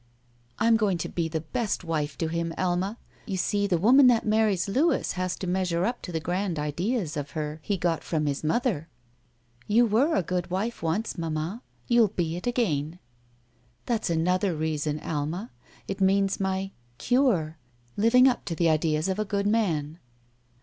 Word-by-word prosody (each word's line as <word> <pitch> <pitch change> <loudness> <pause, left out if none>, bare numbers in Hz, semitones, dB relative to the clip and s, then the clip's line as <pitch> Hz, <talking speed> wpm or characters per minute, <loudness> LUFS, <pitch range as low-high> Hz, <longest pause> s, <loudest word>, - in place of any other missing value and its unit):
"J'm 230 +1 +4
going 205 -5 +1
to 165 - -4
be 170 -2 -1
the 160 -1 -3
best 215 +5 -2
wife 155 -3 -2
to 165 - -1
him. 165 0 -2
Alma. 185 +4 -1 0.3
You. 195 -3 -2
see, 205 +2 0
the 180 -3 +2
woman 255 +9 +6
that 235 -2 +4
marries 215 -4 +2
Louis 285 +11 +1
has 185 -1 -2
to - - -6
measure 180 -1 0
up 240 +1 -2
to 180 - -7
the 165 - -1
grand 175 +2 -2
ideas 165 - -2
of 145 -1 -4
her 150 0 -3
he 200 +4 -1
got 170 -2 -1
from 155 -2 -1
his 145 0 -2
mother." 165 - 0 0.8
"You 230 +3 +4
were 245 +9 +2
a - - +2
good 180 +1 -2
wife 205 +6 -2
once, 175 +5 -2
mamma. 165 +6 -3 0.3
You'll 235 -2 +5
be 175 -5 -2
it 180 - -5
again." 170 - 0 0.9
"That's 225 -5 -1
another 180 +2 +1
reason. 155 -1 -2
Alma; 160 +9 -3 0.4
it 195 0 -4
means 195 +1 +2
my 190 0 -1
— 120 0 -36
cure. 185 - +2 0.4
Living 250 +5 +5
up 250 - +1
to 170 - -3
the 170 0 +2
ideas 155 +1 +1
of 190 +2 -1
a - - +2
good 200 -1 -2
man." 170 -8 0
185 Hz, 175 wpm, -26 LUFS, 160-215 Hz, 0.9 s, woman